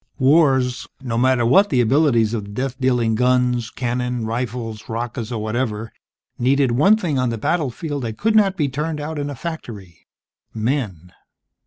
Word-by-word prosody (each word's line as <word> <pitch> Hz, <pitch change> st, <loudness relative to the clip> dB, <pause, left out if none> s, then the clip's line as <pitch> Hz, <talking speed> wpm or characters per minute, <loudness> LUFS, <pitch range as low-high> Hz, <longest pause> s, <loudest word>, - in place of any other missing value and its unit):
Wars, 130 Hz, -3 st, +3 dB
no 125 Hz, -3 st, -4 dB
matter 125 Hz, 0 st, +2 dB
what 195 Hz, -, +5 dB
the 130 Hz, -, +1 dB
abilities 120 Hz, -3 st, +3 dB
of 105 Hz, -3 st, -3 dB
the -, -, -11 dB
death 125 Hz, +5 st, -3 dB
dealing 125 Hz, -3 st, +2 dB
guns, 125 Hz, 0 st, +1 dB
cannon, 125 Hz, -1 st, -2 dB
rifles, 115 Hz, -1 st, -4 dB
rockets 115 Hz, 0 st, -4 dB
or 115 Hz, -, -2 dB
whatever, 110 Hz, 0 st, -3 dB, 0.5 s
needed 135 Hz, +1 st, +2 dB
one 155 Hz, -, +4 dB
thing 160 Hz, -10 st, -1 dB
on 125 Hz, -1 st, +1 dB
the 115 Hz, -, -3 dB
battlefield 145 Hz, +2 st, -2 dB
that 115 Hz, -3 st, -5 dB
could 220 Hz, +1 st, +1 dB
not 195 Hz, -3 st, +4 dB
be 150 Hz, -5 st, +1 dB
turned 150 Hz, +3 st, -3 dB
out 150 Hz, +1 st, -4 dB
in 145 Hz, 0 st, -3 dB
a 145 Hz, -, -5 dB
factory: 110 Hz, -, -8 dB, 0.5 s
Men. 110 Hz, -, -2 dB
125 Hz, 165 wpm, -21 LUFS, 115-145 Hz, 0.5 s, what